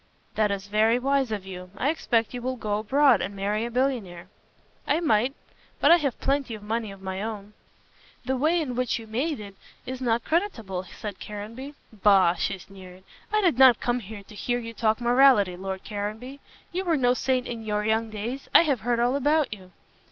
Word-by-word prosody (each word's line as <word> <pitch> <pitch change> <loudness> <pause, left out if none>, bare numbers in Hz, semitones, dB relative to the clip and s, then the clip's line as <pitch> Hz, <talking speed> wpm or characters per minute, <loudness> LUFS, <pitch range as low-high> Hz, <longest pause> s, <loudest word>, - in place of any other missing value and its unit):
"That 215 -1 +2
is 200 -1 -3
very 215 +3 +3
wise 270 -1 +1
of 205 -3 -3
you. 180 -1 -8
I 275 +7 +1
expect 230 -8 0
you 245 - -5
will 255 +1 -2
go 210 -3 -2
abroad 260 +1 +4
and 200 - -4
marry 205 +3 -1
a - - -4
millionaire." 235 -9 -2 0.6
"I 295 - +2
might. 255 -4 +1 0.4
But 290 - +5
I 340 - +9
have 280 -6 -2
plenty 275 -4 -1
of 210 - -11
money 220 0 -2
of 195 -1 -13
my 190 0 -4
own." 210 -1 -6 0.7
"The 265 +2 0
way 315 +7 +2
in 285 -6 -3
which 250 -1 0
you 225 - -9
made 265 +7 -2
it 200 -2 -9 0.3
is 260 +1 -6
not 235 -2 +1
creditable," 225 - -1
said 205 0 -8
Caranby. 230 +7 -8 0.2
"Bah!" 195 -4 +4
she 195 +3 -2
sneered. 185 -1 -13 0.3
"I 430 0 +2
did 340 - +2
not 260 -4 +7
come 245 0 0
here 210 -1 -9
to 205 - -15
hear 245 +4 -1
you 230 -1 -6
talk 220 0 +1
morality, 240 -6 +5
Lord 190 +1 -5
Caranby. 215 +6 -5 0.3
You 370 +2 -2
were 335 -4 +1
no 245 -2 +3
saint 255 0 0
in 230 -2 -6
your 210 -1 -1
young 220 +1 +1
days. 230 +6 -5
I - - +9
have 280 -7 0
heard 235 +3 0
all 245 +3 +2
about 290 -2 +2
you." 190 -3 -12
230 Hz, 205 wpm, -26 LUFS, 205-265 Hz, 0.7 s, I